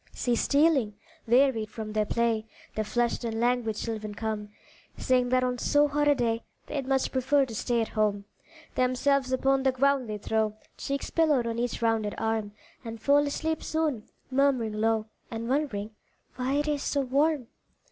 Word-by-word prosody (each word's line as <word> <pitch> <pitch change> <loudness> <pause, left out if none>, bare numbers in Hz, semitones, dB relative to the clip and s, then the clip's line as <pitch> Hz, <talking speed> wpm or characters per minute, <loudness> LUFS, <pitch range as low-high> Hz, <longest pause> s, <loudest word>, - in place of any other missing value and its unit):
See 245 -1 0
stealing, 280 -5 +2 0.3
wearied 240 -3 +3
from 215 -1 -6
their 215 -1 +1
play, 230 -1 0 0.3
The 215 - -1
flushed 240 +3 0
and 225 -1 -2
languid 240 -2 +1
children 215 -2 -4
come, 215 -1 -3 0.5
Saying 250 -1 +2
that 255 0 +3
on 250 -1 -1
so 290 +3 +3
hot 295 +1 +1
a 290 - +5
day 230 -2 0 0.2
They'd 275 -3 -4
much 265 -1 +1
prefer 270 +2 +2
to 240 - -9
stay 235 +2 0
at 225 - -2
home. 210 -2 0 0.5
Themselves 255 +1 +1
upon 270 +1 +2
the 265 0 +3
ground 265 -1 +1
they 210 - -3
throw, 215 0 -1 0.2
Cheeks 275 0 -4
pillowed 300 -7 +3
on 230 0 -2
each 240 -1 -2
rounded 225 -2 +1
arm 220 -2 -1 0.3
And 225 -1 -7
fall 285 +4 +3
asleep 320 +2 -2
soon, 305 -9 -2 0.2
murmuring 260 -5 +2
low, 220 0 +1 0.2
And 230 0 -5
wondering 240 -7 -1 0.4
"why 255 +2 -1
it 295 +1 0
is 295 -2 0
so 285 - 0
warm?" 275 0 +1
245 Hz, 170 wpm, -28 LUFS, 220-275 Hz, 0.5 s, a